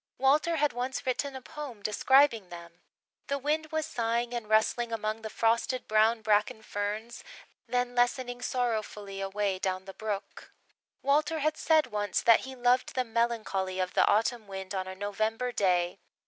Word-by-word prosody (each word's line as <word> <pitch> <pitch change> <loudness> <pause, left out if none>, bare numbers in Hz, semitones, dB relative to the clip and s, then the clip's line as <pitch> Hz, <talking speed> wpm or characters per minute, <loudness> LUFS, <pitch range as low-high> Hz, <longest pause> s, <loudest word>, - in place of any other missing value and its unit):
Walter 295 +5 +3
had 295 -2 +1
once 255 +3 -3
written 265 +2 -1
a 260 - -8
poem 275 -9 -8
describing 230 -1 +3
them. 170 0 -11 0.5
The 280 - 0
wind 305 +3 -1
was 315 -1 -1
sighing 235 0 -1
and 235 -3 -4
rustling 225 +2 +2
among 220 0 -2
the 220 - -5
frosted 230 +3 0
brown 220 +1 +3
bracken 215 +1 +1
ferns, 210 +4 -4 0.4
then 245 0 0
lessening 245 0 0
sorrowfully 215 -5 -2
away 195 -1 -1
down 190 -1 -2
the 195 - -9
brook. 210 -2 -5 0.5
Walter 300 +3 +2
had 310 +1 +1
said 315 -1 +3
once 205 -5 -1
that 230 -1 +6
he 265 0 -8
loved 245 0 +2
the 255 - +2
melancholy 220 -5 -1
of 185 0 -1
the - - +4
autumn 225 +1 +1
wind 190 0 -6
on 190 -1 -2
a 190 - -6
November 215 +5 -2
day. 180 -4 +1
230 Hz, 160 wpm, -29 LUFS, 205-255 Hz, 0.5 s, that